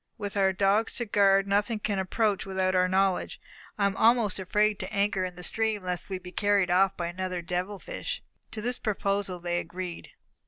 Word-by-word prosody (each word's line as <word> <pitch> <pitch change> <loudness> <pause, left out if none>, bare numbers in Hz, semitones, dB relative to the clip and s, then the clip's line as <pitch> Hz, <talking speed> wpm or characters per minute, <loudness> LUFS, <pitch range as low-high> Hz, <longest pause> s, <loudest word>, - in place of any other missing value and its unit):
With 205 -2 -5
our 195 -1 +3
dogs 200 +4 +1
to 240 - -1
guard, 195 -2 +4
nothing 205 +3 +1
can 205 -2 -2
approach 205 +2 0
without 190 -1 0
our 185 0 +3
knowledge. 190 0 +1 0.4
I 200 - +2
am 200 0 +1
almost 225 -4 +3
afraid 210 +2 +1
to 190 - -5
anchor 200 -1 +1
in 180 -1 -4
the 180 - -9
stream, 220 0 0
lest 180 0 -3
we 190 - -2
should 185 - -8
be 180 - -9
carried 200 -2 +2
off 190 +2 +3
by 175 - -2
another 180 0 -4
devil 180 +4 -3
fish." - - -5 0.3
To 215 - -5
this 245 +1 0
proposal 200 -3 -1
they 175 0 -1
agreed. 175 0 -6
195 Hz, 200 wpm, -28 LUFS, 185-205 Hz, 0.4 s, guard